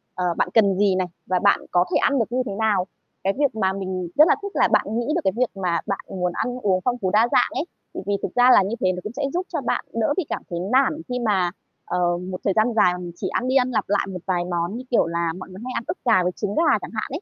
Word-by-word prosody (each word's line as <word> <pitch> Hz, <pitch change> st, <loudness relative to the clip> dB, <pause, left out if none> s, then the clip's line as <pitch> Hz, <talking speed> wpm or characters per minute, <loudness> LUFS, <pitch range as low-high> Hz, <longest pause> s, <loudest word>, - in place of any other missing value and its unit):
ờ, 180 Hz, -, -1 dB
bạn -, -, +1 dB
cần 200 Hz, -4 st, +4 dB
gì 200 Hz, -1 st, +3 dB
này, 185 Hz, -1 st, 0 dB, 0.2 s
và 185 Hz, -1 st, +1 dB
bạn 200 Hz, -, +4 dB
có 175 Hz, 0 st, +3 dB
thể -, -, +3 dB
ăn 280 Hz, -, +2 dB
được 225 Hz, -1 st, -1 dB
như 255 Hz, +1 st, +1 dB
thế 205 Hz, -, -4 dB
nào. 205 Hz, -4 st, +1 dB, 0.4 s
Cái 195 Hz, +1 st, +1 dB
việc 280 Hz, -6 st, +1 dB
mà 190 Hz, -3 st, +1 dB
mình 185 Hz, -2 st, -4 dB
rất 305 Hz, +2 st, +7 dB
là -, -, +4 dB
thích 400 Hz, 0 st, -5 dB
là -, -, +4 dB
bạn -, -, +3 dB
nghĩ 240 Hz, -, -3 dB
được 345 Hz, -, +1 dB
cái 190 Hz, -, +1 dB
việc 250 Hz, -1 st, +2 dB
mà 180 Hz, -3 st, 0 dB
bạn 195 Hz, -, -1 dB
muốn 180 Hz, -2 st, -2 dB
ăn 250 Hz, 0 st, -2 dB
uống 190 Hz, -4 st, +1 dB
phong 250 Hz, 0 st, +1 dB
phú, 190 Hz, -6 st, -1 dB
đa 220 Hz, +4 st, +4 dB
dạng -, -, +3 dB
ấy. -, -, -4 dB, 0.3 s
Thì -, -, -5 dB
vì 205 Hz, -, 0 dB
thực -, -, -4 dB
ra 245 Hz, 0 st, +6 dB
là -, -, +6 dB
như 200 Hz, +5 st, -2 dB
thế 185 Hz, -, +2 dB
nó 180 Hz, -, -4 dB
cũng 210 Hz, -, -6 dB
sẽ 285 Hz, +3 st, -4 dB
giúp 360 Hz, +2 st, -1 dB
cho -, -, -1 dB
bạn -, -, -1 dB
đỡ 230 Hz, +5 st, +1 dB
bị 375 Hz, -, 0 dB
cảm -, -, -3 dB
thấy 170 Hz, -, -3 dB
nản 265 Hz, -, +1 dB
khi 250 Hz, 0 st, -2 dB
mà, 195 Hz, -7 st, +1 dB, 0.3 s
ờ, 175 Hz, -1 st, 0 dB
một 185 Hz, +1 st, -6 dB
thời 195 Hz, -, +1 dB
gian 220 Hz, +4 st, +2 dB
dài 180 Hz, -5 st, +4 dB
mà -, -, -5 dB
mình 175 Hz, -1 st, -7 dB
chỉ -, -, -4 dB
ăn 250 Hz, -, -1 dB
đi 260 Hz, -, 0 dB
ăn 255 Hz, -1 st, +3 dB
lặp 230 Hz, -, 0 dB
lại 205 Hz, -1 st, +1 dB
một 185 Hz, -, -5 dB
vài 180 Hz, -2 st, 0 dB
món, 175 Hz, +3 st, -2 dB
như 255 Hz, -, -7 dB
kiểu 240 Hz, -, +4 dB
là 170 Hz, 0 st, -1 dB
mọi 185 Hz, -, -9 dB
người 185 Hz, +1 st, -10 dB
hay 255 Hz, -, -5 dB
ăn 235 Hz, -, -2 dB
ức 340 Hz, -, -3 dB
gà 185 Hz, -7 st, +4 dB
với 180 Hz, -, 0 dB
trứng 205 Hz, +2 st, -4 dB
gà 320 Hz, -7 st, +4 dB
chẳng -, -, -8 dB
hạn 215 Hz, -1 st, -3 dB
ấy, 295 Hz, +6 st, -4 dB
200 Hz, 305 wpm, -23 LUFS, 185-245 Hz, 0.4 s, rất